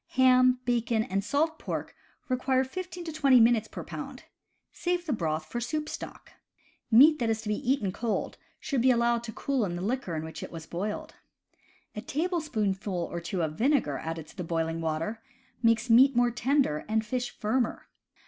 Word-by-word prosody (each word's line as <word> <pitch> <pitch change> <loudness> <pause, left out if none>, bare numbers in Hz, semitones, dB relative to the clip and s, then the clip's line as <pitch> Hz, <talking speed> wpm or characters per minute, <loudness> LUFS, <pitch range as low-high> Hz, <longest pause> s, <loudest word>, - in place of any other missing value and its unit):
Ham, 255 -1 +5
bacon, 235 -2 +1
and 195 -1 -2
salt 315 +7 0
pork - - -5 0.3
require 255 0 +1
fifteen 360 +5 -6
to 330 - -5
twenty 275 -5 +5
minutes 230 -1 +4
per - - -7
pound. - - -8 0.5
Save 355 0 -2
the 300 - -1
broth 160 -6 -2
for 240 +10 -4
soup 305 +5 -2
stock. - - -8 0.6
Meat 290 +7 +7
that 235 -2 0
is 220 0 -1
to 210 - -4
be 245 +5 0
eaten 215 -9 0
cold 225 +3 -3 0.2
should 275 -5 -1
be 260 - +4
allowed 235 -1 +2
to 225 - -6
cool 270 +1 -1
in 175 -4 -2
the 175 - -4
liquor 220 -5 -2
in 155 - -3
which 160 -1 -8
it - - -7
was 165 -1 -8
boiled. 195 +6 -4 0.8
A 210 - -4
tablespoonful 215 - -2
or 170 - -3
two 170 +1 -3
of 155 0 -4
vinegar 240 - +2
added 160 -1 -5
to - - -16
the 180 - -4
boiling 165 0 -2
water 165 +8 -2 0.4
makes 230 0 +3
meat 255 +3 +6
more 245 0 +3
tender 245 - +1
and 220 +1 0
fish 250 +2 -2
firmer. 235 +2 -1
235 Hz, 185 wpm, -28 LUFS, 190-260 Hz, 0.8 s, Meat